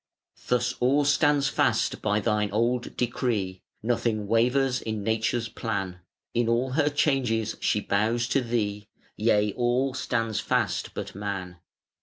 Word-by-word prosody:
Thus 125 0 +1
all 140 +4 +3
stands 145 -1 +3
fast - - +1
by 105 +1 +1
Thine 105 -1 0
old 120 +4 -1
decree, 110 -6 -1 0.2
Nothing 115 -2 0
wavers 125 +4 +2
in 110 -2 -3
Nature's 115 +2 0
plan: 100 -6 -4 0.3
In 120 -1 +1
all 120 +3 +1
her 145 +2 +2
changes 125 -7 +1
she 105 - +1
bows 115 +5 +1
to 135 - +2
Thee: 105 -4 -2 0.3
Yea, 105 -2 +2
all 125 +2 +1
stands 115 -4 -1
fast - - -1
but - - -5
Man. 95 -3 -5
115 Hz, 135 wpm, -26 LUFS, 105-125 Hz, 0.3 s, all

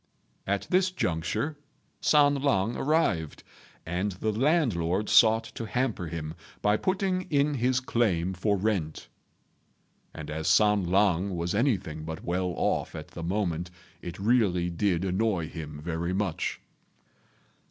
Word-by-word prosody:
At 100 0 0
this 185 +1 +3
juncture 145 - -2 0.4
San 145 -1 +5
lang 115 -5 +1
arrived, 135 - 0 0.4
and 90 +4 -2
the 110 +4 -2
landlord 105 - +1
sought 110 +1 +6
to 115 - -5
hamper 120 -7 -1
him 80 -1 -5 0.3
by 105 0 +4
putting 185 - -1
in 145 0 +2
his 130 -1 +1
claim 95 -8 0
for 100 +3 0
rent; 95 -7 -2 1.0
and, 75 -1 -8
as 80 +1 -3
San 105 -3 +4
lang 95 -1 +2
was 85 +1 -2
anything 100 - 0
but 80 0 -6
well 90 +1 -1
off - - -1
at - - -8
the - - -8
moment, 85 -2 -2 0.3
it 85 0 -7
really 100 -5 +2
did 90 0 0
annoy 95 -3 0
him 75 -3 -7
very 85 +2 -2
much. 95 -4 -2
100 Hz, 130 wpm, -28 LUFS, 85-120 Hz, 1.0 s, sought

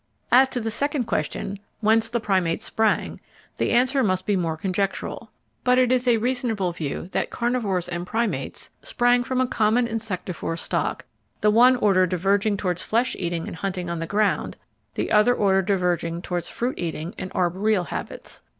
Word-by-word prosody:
As 260 +2 +6
to 250 - -2
the 225 -1 -3
second 285 +3 0
question: 200 -1 -3 0.2
Whence 225 +1 +3
the 235 0 -1
Primates 185 -6 0
sprang, 220 -1 0 0.4
the - - 0
answer 255 +3 +3
must 185 -3 0
be 205 - +1
more 165 -3 -1
conjectural. 195 +3 -2 0.3
But 250 0 +4
it 255 -1 +4
is 255 0 +2
a 235 -2 +5
reasonable 230 -6 -1
view 160 -1 -4
that - - -1
Carnivores 225 -7 -1
and 175 0 -4
Primates 230 +2 -2
sprang 245 0 +2
from 255 +1 -1
a 255 - +3
common 235 +1 +2
Insectivore 185 -7 -4
stock, - - -2 0.4
the 210 - +4
one 245 +4 +6
order 195 -6 +3
diverging 200 +4 +1
towards 180 -2 -2
flesh 245 +4 0
eating 170 -2 -2
and - - -7
hunting 180 -1 -3
on 170 - -3
the 165 - -3
ground, 205 +2 0 0.4
the - - -2
other 215 +4 +5
order 195 -3 +3
diverging 175 -3 0
towards 175 -2 -3
fruit 245 +2 -3
eating 165 0 -4
and 185 - -5
arboreal 185 +3 +1
habits. - - -7
205 Hz, 170 wpm, -24 LUFS, 180-240 Hz, 0.4 s, As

